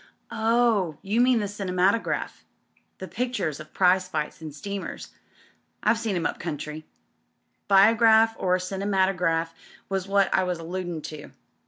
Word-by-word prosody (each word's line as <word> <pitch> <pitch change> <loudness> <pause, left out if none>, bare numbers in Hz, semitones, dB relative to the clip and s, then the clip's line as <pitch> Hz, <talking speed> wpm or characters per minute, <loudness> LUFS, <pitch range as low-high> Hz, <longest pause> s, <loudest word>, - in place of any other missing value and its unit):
'" - - -27 0.2
"Oh, 220 -10 +2
you 215 +5 +1
mean 250 0 +4
the 205 - -2
cinematograph 195 +1 -1 0.3
— - - -40
the 190 - -7
pictures 215 - -3
of 155 0 -11
prize 185 0 +3
fights 155 -3 -4
and 155 -1 -7
steamers. 200 +7 -6 0.7
I've 230 - +3
seen 225 -4 -2
'em 170 -2 -2
up - - -2
country." 155 -1 -6 0.8
"Biograph 225 +3 +5
or 185 -1 +2
cinematograph 185 -3 0 0.4
was 195 -1 -2
what 200 0 +2
I 190 - +3
was 180 -1 -2
alludin' 170 -1 -5
to. 155 -2 -9
190 Hz, 145 wpm, -25 LUFS, 170-205 Hz, 0.8 s, Biograph